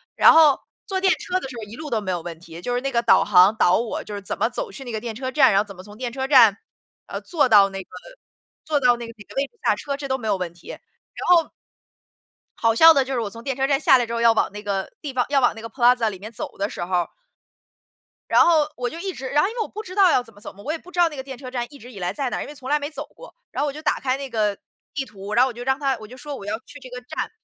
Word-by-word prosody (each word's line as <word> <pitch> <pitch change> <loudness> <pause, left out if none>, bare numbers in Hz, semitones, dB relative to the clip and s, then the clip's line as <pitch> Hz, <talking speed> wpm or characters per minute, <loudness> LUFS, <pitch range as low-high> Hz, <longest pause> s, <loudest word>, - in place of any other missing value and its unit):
然 - - +7
后 315 -4 +6 0.3
坐 380 -1 -2
电 380 -1 +4
车 365 +1 -2
的 315 - -6
时 260 - -9
候 225 - -6
一 210 +2 -10
路 310 -1 -7
都 225 -4 0
没 190 -2 -3
有 175 -2 -2
问 165 -1 -7
题， 170 0 -11
就 245 +6 -2
是 245 - -1
那 275 +1 -2
个 235 - +2
导 - - +5
航 195 +1 +5
导 180 -4 +4
我 230 -1 -3
就 210 - -9
是 205 - -5
怎 195 - -5
么 - - +1
走 - - -4
去 275 - -9
那 245 - -7
个 220 - -3
电 225 0 -6
车 260 +2 -4
站， 265 -1 +5
然 195 - +4
后 - - -5
怎 200 - -10
么 180 - -10
从 205 +2 -14
电 245 0 -4
车 265 +2 -3
站， 235 -8 +6 0.5
呃， - - -6
坐 325 -6 +1
到 205 -4 +6
那 195 0 -6
个 185 - -15 0.8
坐 305 -2 +1
到 245 -2 +4
那 235 -1 -7
个 230 - -10
哪 205 - -12
个 - - -15
位 275 - +2
置 - - -48
下 - - +4
车， 280 -1 -4
这 275 -1 -7
都 265 - +1
没 225 -4 -6
有 205 - +2
问 180 -3 -4
题， 170 - -16
然 - - -9 0.5
后 340 -2 +5 1.1
好 225 0 +2
笑 325 +8 +8
的 275 -3 +3
就 265 +1 -5
是 250 - 0
我 220 -3 -2
从 230 +3 -11
电 270 0 -2
车 270 +1 0
站 275 -1 +2
下 270 -3 +6
来 245 - 0
之 230 - -6
后 230 - -1
要 230 0 +6
往 225 - +1
那 210 +1 -8
个 195 -2 -2
地 290 -4 -6
方 250 -1 +1
要 285 -1 +3
往 245 - +3
那 225 - -9
个 230 - -7
Plaza 240 -1 +3
里 195 - -8
面 215 +3 -9
走 225 - -7
的 200 +1 -1
时 - - -5
候 175 -1 0 1.3
然 - - +6
后， 315 -3 +4
我 245 0 -2
就 325 - -9
一 380 +1 -4
直 265 -4 -6
然 295 +2 +3
后 - - +2
因 455 - -9
为 475 - -2
我 - - -2
不 430 - -8
知 370 - -9
道 380 -3 +5
要 250 - +2
怎 225 -2 -17
么 205 - -18
走 - - -8
嘛， 200 - -14
我 295 - -2
也 325 - -2
不 360 +3 -16
知 360 - -4
道 345 -1 +5
那 305 - -9
个 265 - -5
电 265 -1 -8
车 255 0 -8
站 245 -2 -2
一 290 - -13
直 250 -1 -13
以 205 - -10
来 180 -1 -1
在 275 -3 -3
哪 - - -3
儿， - - -4
因 - - -9
为 295 - -10
从 265 -2 -10
来 295 +1 +2
没 290 0 -4
走 310 - -7
过。 - - -13 0.2
然 - - -3
后 295 - +1
我 280 - -3
就 305 - -8
打 - - 0
开 260 0 -1
那 275 -1 -6
个， 210 -4 0 0.4
地 275 -2 -3
图， 200 -2 -8
然 240 - +5
后 265 - +2
我 - - -7
就 240 +1 -8
让 265 +2 0
它 270 -3 0
我 215 - -10
就 250 - -12
说 290 +1 -7
我 200 - -9
要 210 +2 -2
去 290 - -13
这 260 - -12
个 250 0 -7
站， 250 - -5
250 Hz, 365 characters per minute, -23 LUFS, 215-285 Hz, 1.3 s, 笑